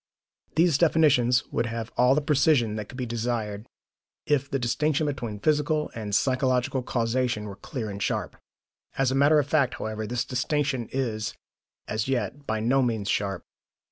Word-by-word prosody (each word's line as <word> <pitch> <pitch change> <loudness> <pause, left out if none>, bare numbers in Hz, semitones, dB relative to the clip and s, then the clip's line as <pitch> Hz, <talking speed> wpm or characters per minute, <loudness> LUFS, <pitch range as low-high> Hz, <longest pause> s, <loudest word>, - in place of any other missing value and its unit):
These 165 -3 +4
definitions 145 -7 +4
would 115 - 0
have 115 0 -5
all 125 +2 +4
the 150 - +2
precision 140 -6 +3
that 105 -1 -5
could 125 - -10
be 125 - -2
desired 115 -2 -3 0.6
if 140 -2 +1
the 135 - 0
distinction 150 +5 0
between 125 -7 -3
physical 150 +3 +1
and 105 -3 -3
psychological 130 0 +1
causation 120 -2 -1
were 100 -2 -7
clear 110 +2 -5
and 100 -1 -6
sharp. - - -2 0.6
As 135 -1 +2
a - - 0
matter 145 +3 +5
of 145 - +3
fact, 140 -3 +1
however, 110 0 -4
this 125 +1 -1
distinction 135 -1 -1
is, 115 -5 -2 0.5
as 110 +2 -2
yet, 135 +2 -2
by 110 0 0
no 125 +5 +2
means 110 -5 -1
sharp. 100 -3 -1
125 Hz, 165 wpm, -26 LUFS, 110-140 Hz, 0.6 s, matter